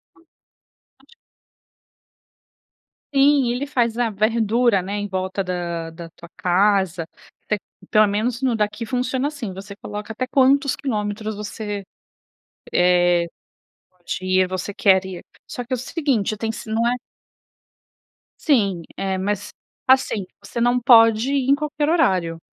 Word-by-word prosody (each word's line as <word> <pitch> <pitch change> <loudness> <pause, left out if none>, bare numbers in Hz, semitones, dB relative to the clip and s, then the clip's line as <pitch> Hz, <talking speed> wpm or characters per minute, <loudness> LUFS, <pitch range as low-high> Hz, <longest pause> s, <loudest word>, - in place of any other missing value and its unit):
Hum, 350 -2 -25 0.8
lógico. - - -22 2.0
Sim, 275 -3 +4
ele 255 +4 -3
faz 235 -5 0
a 240 -2 +1
verdura, 220 0 +2
né, 195 +2 -5
em 205 - -2
volta 190 +1 -2
da 170 -2 -3
da 165 0 -10
tua 170 +1 -14
casa 185 -2 +2 0.4
té 210 - 0 0.3
pelo 215 0 +5
menos 230 +5 -1
no 250 -3 +1
daqui 210 +2 -1
funciona 255 +3 -1
assim, 275 -10 -6
você 200 +2 -9
coloca 210 +1 -7
até 255 +3 -3
quantos 275 +1 +3
quilômetros 215 -4 -3
você, 205 -1 -5 0.9
eh, 175 -1 +4 0.6
pode 180 -1 -6
ir, 185 0 +3
você 185 +2 -4
quer 190 -1 +4
ir. 185 -2 -7 0.2
Só 245 - -5
que 250 +2 -5
é - - +3
o - - -5
seguinte 255 - -1
tem 225 0 -2
se 220 - -9
não 225 +2 +1
é 245 - +1 1.5
Sim, 200 - +2
é, 190 -1 -1
mas, 205 +2 -3 0.3
assim, 260 -7 +3 0.2
você 235 +4 -5
não 245 +1 +3
pode 230 +1 +5
ir 270 -1 +1
em - - +7
qualquer 295 0 -2
horário. 185 - +2
215 Hz, 140 wpm, -22 LUFS, 190-250 Hz, 2.0 s, em